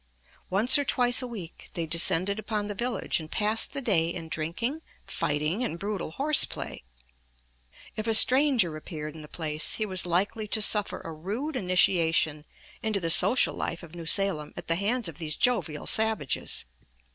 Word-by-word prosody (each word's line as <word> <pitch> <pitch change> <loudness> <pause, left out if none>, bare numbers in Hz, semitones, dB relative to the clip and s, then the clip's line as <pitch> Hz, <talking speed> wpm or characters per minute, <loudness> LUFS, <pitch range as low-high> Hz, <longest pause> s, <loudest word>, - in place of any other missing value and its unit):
Once 230 +9 +4
or - - 0
twice 245 -2 +3
a 250 - -5
week 195 -9 -10
they 170 - -2
descended 180 +5 +2
upon 215 -1 -3
the 205 - -5
village 240 -1 -2
and 155 -1 -9
passed 215 +3 +2
the 275 -1 -5
day 170 -8 +2
in 170 -2 -6
drinking, 230 - -3 0.2
fighting, 150 +10 -2
and 200 -9 -3
brutal 200 -1 -4
horse 280 - +4
play. - - -5 1.1
If 215 +1 -5
a 225 - +6
stranger 255 - +5
appeared 155 -1 -8
in 160 - -11
the 150 - -11
place, 155 -1 0
he 220 - -2
was 185 -3 0
likely 200 +5 -1
to 215 - 0
suffer 210 -1 +2
a 165 - -8
rude 215 - -5
initiation 165 - +1 0.4
into 215 -2 -1
the 165 -2 +1
social 195 +8 +4
life - - -5
of 165 -1 -13
New 170 -2 -8
Salem 180 -6 0
at - - -8
the 165 - +2
hands 215 +4 -1
of 165 -1 -8
these 155 -2 -2
jovial 200 -12 0
savages. 220 - 0
195 Hz, 175 wpm, -26 LUFS, 165-225 Hz, 1.1 s, a